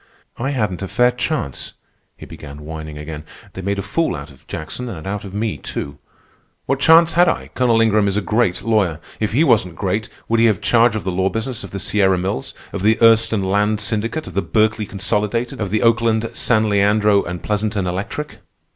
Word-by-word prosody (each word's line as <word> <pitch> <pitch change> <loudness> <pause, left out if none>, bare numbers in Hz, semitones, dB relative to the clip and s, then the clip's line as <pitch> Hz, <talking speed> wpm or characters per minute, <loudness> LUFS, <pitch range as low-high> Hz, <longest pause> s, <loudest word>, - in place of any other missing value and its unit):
"I 130 +3 -2
hadn't 105 -10 -1
a 95 - -3
fair 125 +5 +3
chance," 125 - -3 0.4
he - - -10
began 70 0 -10
whining 80 -1 -7
again. 75 0 -7 0.3
"They 95 - -6
made 100 +2 -2
a 100 - -3
fool 165 0 0
out 70 0 -8
of 65 - -20
Jackson 120 +10 -5
and 80 -7 -7
out 100 +1 -3
of 100 -1 -9
me, 110 0 -2
too. 70 0 -5 0.7
What 135 0 0
chance 165 +3 +6
had 175 0 +5
I? - - -3
Colonel 120 -3 +2
Ingram 110 -2 +3
is 100 0 0
a - - +1
great 105 -3 0
lawyer. 100 -8 +1 0.2
If 110 -1 -1
he 145 +7 +4
wasn't 90 - +2
great, 105 +4 -2 0.2
would 115 0 +2
he 115 - +5
have 105 -5 +1
charge 115 -1 +3
of 110 - -3
the 95 - -2
law 95 +2 +1
business 115 +4 -4
of 100 - -8
the 100 - -6
Sierra 95 -1 +2
Mills, 90 -7 -3 0.2
of - - -3
the 110 +3 +4
Erston 115 -2 +4
Land 105 +2 +1
Syndicate, 110 +8 -2
of 95 - -9
the 100 - +1
Berkeley 110 +3 +1
Consolidated, 105 +4 -2
of 100 - -1
the 110 +2 0
Oakland, 115 -1 +2
San 110 -2 +2
Leandro, 105 0 +3
and 90 0 -6
Pleasanton 105 -2 -1
Electric? 100 +12 -4
105 Hz, 205 wpm, -19 LUFS, 95-115 Hz, 0.7 s, chance